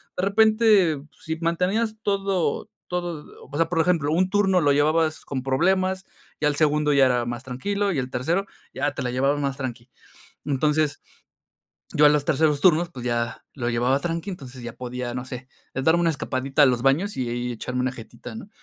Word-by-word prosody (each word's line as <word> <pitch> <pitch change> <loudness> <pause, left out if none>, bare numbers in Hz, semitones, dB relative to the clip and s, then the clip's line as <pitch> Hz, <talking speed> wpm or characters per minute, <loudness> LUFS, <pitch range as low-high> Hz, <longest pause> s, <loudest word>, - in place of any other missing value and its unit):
de 180 - -2
repente, 210 -6 +4 0.2
si 160 0 -4
mantenías 185 +7 0
todo 195 -6 -1 0.2
todo 175 -4 -4 0.3
o 145 - -4
sea, 165 - +2
por 165 -1 -1
ejemplo, 160 -4 +1
un 185 +2 +2
turno 190 -3 +3
lo 145 -1 +3
llevabas 155 +2 +2
con 130 -2 -4
problemas, 185 +7 +1 0.3
ya 150 - +2
el 145 - +1
segundo 150 -1 +2
ya 135 -1 +6
era 125 -2 +1
más 120 +2 -5
tranquilo 200 +11 -2
y 145 - -1
el 130 0 -3
tercero 170 +11 -1 0.3
ya 145 +1 -1
te - - -4
la 125 - -2
llevaban 140 +3 +1
más 140 0 -2
tranqui. 125 -2 -6 0.5
Entonces, 150 +1 0 0.9
yo 150 0 +6
a - - +9
los 145 -1 +2
terceros 150 -2 +2
turnos, 175 -1 +4
pues 125 -7 -9
ya 120 -1 -2
lo 120 -4 -3
llevaba 125 +3 +1
tranqui, 170 +4 -3
entonces 130 -8 -9
ya 120 - -6
podía, 125 -1 -5
no 125 +1 -5
sé, 130 0 -8 0.3
eh, 135 - -2
darme 160 +4 +4
una 170 - +3
escapadita 135 0 0
a - - +8
los 125 -2 +2
baños 145 - +1
y 120 0 -2
echarme 125 +2 -4
una 130 0 0
jetita, 120 - -10
¿no? 220 -2 -9
150 Hz, 195 wpm, -24 LUFS, 130-175 Hz, 0.9 s, a